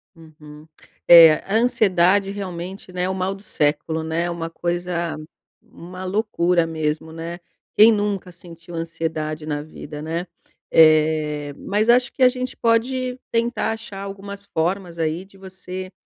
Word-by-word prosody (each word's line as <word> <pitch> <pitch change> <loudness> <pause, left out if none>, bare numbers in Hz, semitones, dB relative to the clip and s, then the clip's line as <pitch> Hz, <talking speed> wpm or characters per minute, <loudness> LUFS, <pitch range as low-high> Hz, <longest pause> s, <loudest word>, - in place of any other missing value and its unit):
Uhum. 155 -2 -15 0.4
É, 165 -2 +10
a 195 - -2
ansiedade 200 -5 +3
realmente, 185 -1 -7
né, 180 0 -2
é 185 - 0
o - - -1
mal 190 +1 -2
do 195 - -15
século, 160 -1 -1
né. 165 +2 -1
Uma 165 -1 -4
coisa 175 0 -3 0.5
uma 180 +2 -10
loucura 180 -4 +1
mesmo, 160 -1 -3
né. 165 +2 -7 0.4
Quem 220 +2 +8
nunca 205 -3 -1
sentiu 170 -1 -13
ansiedade 160 -2 -4
na 145 -1 -3
vida, 150 -1 -9
né. 165 +3 -3 0.5
Eh, 155 -2 +3
mas 210 +3 -1
acho 245 +2 +4
que 265 - 0
a 250 - +8
gente 255 0 -5
pode 250 +2 0
tentar 235 0 0
achar 220 -3 -8
algumas 200 0 -8
formas, 175 0 -2
aí, 165 +3 -2
de 195 0 -20
você, 185 -1 -8
175 Hz, 145 wpm, -22 LUFS, 160-200 Hz, 0.5 s, É